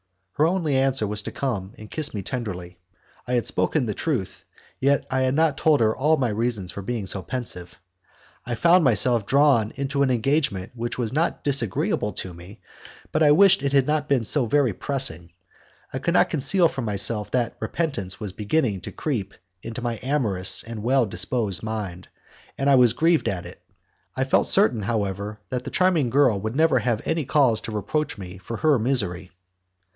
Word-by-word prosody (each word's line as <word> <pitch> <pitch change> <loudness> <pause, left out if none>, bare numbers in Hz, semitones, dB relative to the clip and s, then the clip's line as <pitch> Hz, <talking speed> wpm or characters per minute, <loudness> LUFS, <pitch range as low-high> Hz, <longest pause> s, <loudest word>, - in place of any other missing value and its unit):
Her 155 - +2
only 165 -5 0
answer 135 -3 +1
was 105 +1 -4
to - - -6
come 105 -8 -4
and 110 0 -12
kiss 155 -2 +1
me 100 - -4
tenderly. 90 -7 -6 0.5
I 125 - -2
had 120 -2 +1
spoken 150 -5 0
the 105 - -2
truth, 125 - -3 0.4
yet 140 +1 +2
I 130 0 +1
had 130 +1 +1
not 155 -2 +1
told 155 -3 +3
her 110 -1 +2
all 155 +4 +2
my 125 -3 0
reasons 105 -4 -2
for 100 - -7
being 110 0 -4
so 95 +1 -3
pensive. 105 -8 -5 0.7
I 120 - -3
found 170 +8 +4
myself 120 -3 +3
drawn 135 -6 +3
into 140 +1 -2
an 140 - +3
engagement 120 -6 0
which 120 -1 -4
was 120 -1 -2
not 160 +4 -1
disagreeable 115 -6 0
to 90 0 -6
me, 85 +4 -13 0.5
but - - 0
I 150 - +6
wished 190 +5 +6
it 140 0 -2
had 135 -2 +4
not 150 0 -1
been 135 -4 +2
so 125 +2 +2
very 130 -2 +2
pressing. 90 - -1 0.6
I - - -2
could - - -1
not - - +3
conceal 175 +6 +3
from 135 -6 -5
myself 105 +1 +1
that 120 -2 -1
repentance 120 - -3
was 105 -3 -4
beginning 105 - -1
to - - -8
creep 110 -10 -4 0.3
into 115 +2 -7
my 120 -3 -3
amorous 115 -10 +2
and 115 -2 -7
well 125 +2 +2
disposed 100 0 -1
mind, 105 -5 -5 0.5
and 135 - -1
I 140 - +5
was 125 -3 +5
grieved 165 +5 +2
at 90 -3 -4
it. - - -12 0.6
I - - +1
felt - - +2
certain, 110 0 +3
however, 100 -1 -3
that 125 -1 -2
the - - -4
charming 175 -8 +2
girl 125 -6 +3
would 110 +3 -4
never 155 -4 +3
have 120 -2 -1
any 160 -3 -1
cause 125 -6 +2
to - - -7
reproach 120 +7 -2
me 95 -1 -9
for 115 +5 -6
her 155 -5 +2
misery. 100 -7 -1
120 Hz, 190 wpm, -23 LUFS, 105-140 Hz, 0.7 s, I